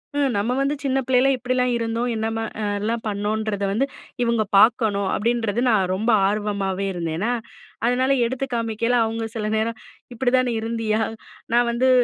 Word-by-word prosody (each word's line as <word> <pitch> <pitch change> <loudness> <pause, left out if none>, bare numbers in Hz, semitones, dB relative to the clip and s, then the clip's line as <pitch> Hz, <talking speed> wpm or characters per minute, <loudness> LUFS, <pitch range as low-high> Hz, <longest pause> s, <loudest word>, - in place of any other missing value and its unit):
ம் 285 -1 +2
நம்ம 205 +4 0
வந்து 275 +2 +1
சின்ன 270 -1 +1
பிள்ளைல 260 +1 +4
இப்படிலா 250 0 0
இருந்தோம், 230 +1 -1
என்னமா 225 0 -2 0.2
அ - - -2 0.2
யெல்லாம் 225 +3 -2
பண்ணோன்றத 210 0 -2
வந்து 230 +7 +1 0.4
இவுங்க 235 -2 +2
பார்க்கணும், 205 -3 +4
அப்படின்றது 230 0 0
நான் 195 -5 +2
ரொம்ப 220 +5 +1 0.2
ஆர்வமாவே 200 -2 -1
இருந்தேன்னா, 170 +5 -2 0.6
அதுனால 255 +2 +2
எடுத்து 260 +3 -2
காமிக்கல 230 +1 0
அவுங்க 225 0 -3
சில 215 -2 -2
நேரம் 220 +1 -1 0.4
"இப்படி 245 +1 +1
தான் 255 0 +3
நீ - - -1
இருந்தியா?" 225 -1 -1 0.5
நான் 240 0 +4
வந்து 250 +2 +2
225 Hz, 155 wpm, -23 LUFS, 210-245 Hz, 0.6 s, பிள்ளைல